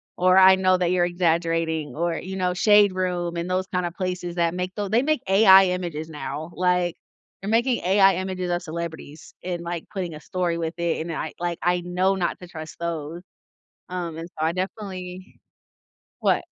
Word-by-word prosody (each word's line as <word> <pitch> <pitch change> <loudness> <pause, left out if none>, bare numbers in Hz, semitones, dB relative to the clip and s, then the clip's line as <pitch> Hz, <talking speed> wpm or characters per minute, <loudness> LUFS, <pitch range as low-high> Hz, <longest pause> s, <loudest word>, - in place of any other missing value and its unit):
or, 185 +1 +4
"I 190 0 +9
know 185 0 +3
that 180 -1 0
you're 175 -1 +3
exaggerating," 165 -4 0
or, 170 +1 0
you 190 +1 -6
know, 180 -1 0
shade 205 +1 +5
room 180 -2 -2
and 170 +1 -3
those 185 +1 0
kinda 180 -1 0
places 180 -1 -4
that 170 -1 +1
make 180 +1 -4
tho 205 -1 -2
they 225 +5 +2
make 305 -2 0
AI 195 -1 +7
images 160 -3 -5
now, 150 +1 -6
like, 180 -1 +1 0.5
they're 195 - -4
making 235 +2 +2
AI 195 +1 +5
images 185 -1 -3
of 175 - 0
celebrities 160 -2 -7
and, 175 -1 -4
like, 170 -1 -4
putting 185 -5 -4
a 150 - -8
story 175 +1 -2
with 165 0 -3
it, 170 -2 -1
and 165 +1 -4
I 155 -1 -4
like, 175 -1 -2
I 175 0 +2
know 180 +2 +1
not 180 -2 -2
to 180 - -9
trust 160 -2 -9
those, 170 0 -4 0.7
um, 175 -3 -4
and 165 +2 -7
so 155 - -3
I 165 - +1
definitely 185 -1 -6 0.8
What? - - +2
180 Hz, 190 wpm, -24 LUFS, 170-185 Hz, 0.8 s, I